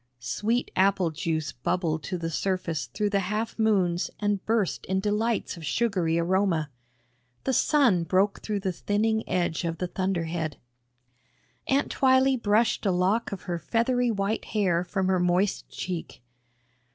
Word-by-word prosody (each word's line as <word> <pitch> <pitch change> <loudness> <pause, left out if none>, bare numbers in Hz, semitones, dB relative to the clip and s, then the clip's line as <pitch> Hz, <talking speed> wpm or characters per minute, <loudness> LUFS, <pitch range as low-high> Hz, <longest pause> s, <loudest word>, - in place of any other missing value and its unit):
Sweet 210 - -1
apple 190 -3 +3
juice 160 -1 -2
bubbled 160 +4 -1
to 180 - -3
the 165 -1 -4
surface 165 -7 -2
through 205 - -2
the 200 - +2
half 210 +5 -3
moons 190 -6 +2
and 205 -2 0
burst 220 -4 0
in 190 +1 +1
delights 210 +1 -1
of 165 - -10
sugary 180 -3 +1
aroma. 170 -3 +1 0.7
The 265 - 0
sun 245 - +3
broke 195 +4 +1
through 210 -2 -2
the 190 -1 -1
thinning 220 +4 0
edge 175 -2 0
of 165 -1 -2
the 180 - -2
thunderhead. 170 -4 -2 1.1
Aunt 275 +2 +1
Twylee 260 -1 +3
brushed 215 +2 +2
a - - +3
lock 185 +6 +1
of 200 - -6
her 175 -3 -3
feathery 245 +4 +1
white 205 0 -1
hair 185 -5 +1
from 190 +1 -2
her 185 -1 +2
moist 180 +3 +1
cheek. 175 -8 -6
190 Hz, 150 wpm, -27 LUFS, 170-215 Hz, 1.1 s, apple